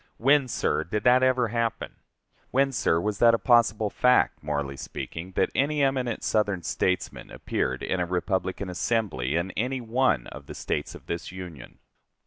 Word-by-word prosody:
When, 140 +2 +4
sir, - - 0
did 105 +4 -3
that 125 +1 +5
ever 130 -2 +2
happen? 115 0 -2 0.5
When, 135 +1 +2
sir, 85 -9 +1
was 105 +2 -2
that 115 -1 +6
a - - 0
possible 115 -4 +3
fact, 125 0 +3
morally 70 -2 -3
speaking, 85 +6 -7
that - - +1
any 145 +1 +1
eminent 130 -3 0
Southern 100 -4 0
statesman 95 0 -2
appeared - - -2
in 95 - -1
a 90 - 0
Republican 95 +2 -2
assembly 90 - -1
in 85 +3 -1
any 125 +7 -2
one 120 - +1
of - - -10
the - - -8
States - - -3
of - - -13
this 85 +1 -5
Union? 90 -8 -9
105 Hz, 165 wpm, -26 LUFS, 90-125 Hz, 0.5 s, that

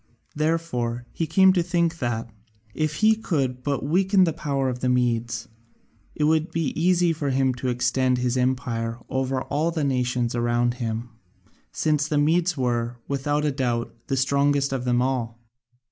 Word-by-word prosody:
Therefore 145 -7 -1
he 165 - -2
came 190 +4 +5
to 180 - +2
think 170 -1 0
that, 120 -2 -2 0.5
if 155 -1 -1
he 220 - +7
could 135 - -2
but 140 0 -2
weaken 190 +5 +3
the 165 -3 +1
power 140 -4 -1
of 125 -1 -2
the 125 - 0
Medes, 120 -2 0 0.7
it 150 - -1
would 155 +2 +2
be 165 -4 -1
easy 175 0 +2
for 150 -3 -2
him 130 -1 +2
to 125 +1 -5
extend 125 +1 +1
his 125 0 0
empire 125 -3 -1
over 130 0 -1
all 150 +4 0
the 165 -3 -2
nations 125 -3 0
round 120 0 +1
him, 115 +1 -3 0.6
since 150 - 0
the 150 -2 0
Medes 165 +3 +2
were, 120 -2 -1
without 145 +2 0
doubt, 120 -3 -1
the 135 -3 -1
strongest 140 +1 +2
of 130 -2 -3
them 125 0 +2
all. 120 -3 -2
135 Hz, 160 wpm, -24 LUFS, 125-155 Hz, 0.7 s, he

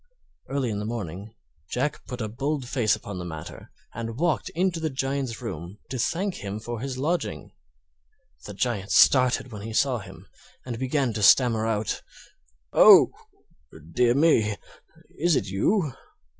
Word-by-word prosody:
Early 135 -4 -1
in 105 - -3
the 105 - -4
morning 105 -1 -6 0.3
Jack 140 +4 -2
put 125 -2 -6
a 110 - -2
bold 135 +4 -3
face 120 -5 +2
upon 100 -3 -7
the - - -5
matter 80 -3 -8 0.2
and 115 0 -5
walked 165 +1 0
into 180 -1 0
the 160 -1 -1
Giant's 135 -3 -3
room 90 -2 -6
to 130 - -3
thank 185 - -1
him 100 +1 -4
for 120 +1 -6
his 130 +1 -4
lodging. 145 - -2 0.9
The 105 - -8
Giant 105 -3 -2
started 130 -1 +4
when 105 -2 -7
he 110 +2 -6
saw 125 +1 +2
him, 100 - -12 0.4
and 120 -3 -5
began 130 -2 0
to 105 - -3
stammer 115 +1 +5
out: 110 -2 -1 0.7
"Oh! - - +8 0.8
dear 120 -1 +3
me; 115 -9 +3 0.6
is 170 0 +3
it - - 0
you? 140 - 0
120 Hz, 155 wpm, -25 LUFS, 105-140 Hz, 0.9 s, Oh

